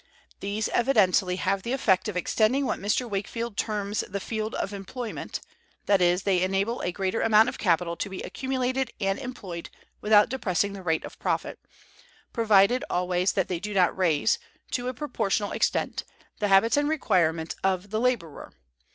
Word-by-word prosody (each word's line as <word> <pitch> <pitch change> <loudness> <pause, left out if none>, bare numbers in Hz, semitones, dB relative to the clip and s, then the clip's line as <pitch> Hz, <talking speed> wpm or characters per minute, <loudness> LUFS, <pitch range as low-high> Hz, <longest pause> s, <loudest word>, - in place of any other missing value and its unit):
These 205 +2 -2
evidently 195 -7 +3
have 190 +1 0
the 235 +6 -3
effect 220 -6 +2
of 205 -4 -3
extending 225 +9 +2
what - - -1
Mr. 210 +5 0
Wakefield 220 +2 -4
terms 210 -1 -2
the 200 - -3
field 220 +2 -3
of 200 - -3
employment, 220 +4 -6 0.4
that 200 -2 +3
is, 180 +1 +3
they 190 -3 +2
enable 195 +5 0
a 180 - -1
greater 190 +4 -1
amount 220 +2 +5
of - - -8
capital 170 -2 +1
to 205 - -3
be 190 - -6
accumulated 260 -1 -2
and 195 -1 0
employed 200 -10 -7 0.3
without 210 0 +5
depressing 200 -6 -1
the 195 - -8
rate 160 -3 0
of - - -11
profit; - - -2 0.7
provided 225 +1 +4
always 180 +1 +1
that 190 -3 0
they 180 -2 -2
do 210 +2 -5
not 180 -2 +3
raise, 175 0 +2 0.3
to 245 0 -2
a 255 - -2
proportional 225 -6 -1
extent, - - 0 0.4
the 210 - +1
habits 200 +6 +4
and 290 0 +2
requirements 165 - +1
of 190 +1 0
the 215 - 0
laborer. 230 - -2
200 Hz, 170 wpm, -26 LUFS, 185-230 Hz, 0.7 s, amount